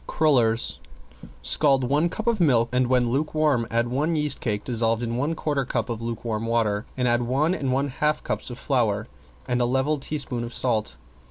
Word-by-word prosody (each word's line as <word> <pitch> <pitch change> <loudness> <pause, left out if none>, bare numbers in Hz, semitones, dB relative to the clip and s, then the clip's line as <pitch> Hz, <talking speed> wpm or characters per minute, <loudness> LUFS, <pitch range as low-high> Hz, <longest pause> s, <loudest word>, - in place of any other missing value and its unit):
~CRULLERS~ 120 - +2 0.6
Scald 135 -3 +3
one 145 +7 +2
cup 220 - -5
of 235 -3 +1
milk, 120 -8 +3
and 125 0 +2
when 125 -2 +2
lukewarm 150 -3 +1
add 115 +1 +1
one 145 +7 0
yeast 150 -1 +1
cake 105 -3 -2
dissolved 115 -1 0
in 115 0 -2
one 145 +6 -1
quarter 145 -3 -1
cup 125 - -2
of 115 -1 -4
lukewarm 115 -1 -3
water, 110 -2 0
and 125 -1 +1
add 120 0 +3
one 135 +8 +1
and 135 -7 -2
one 135 +2 0
half 150 +3 0
cups - - -3
of 120 - -7
flour 115 -6 0 0.4
and 125 -1 0
a - - +3
level 130 +4 +1
teaspoon 135 -4 -3
of 120 +1 -6
salt. 115 -4 0
125 Hz, 190 wpm, -24 LUFS, 115-145 Hz, 0.6 s, Scald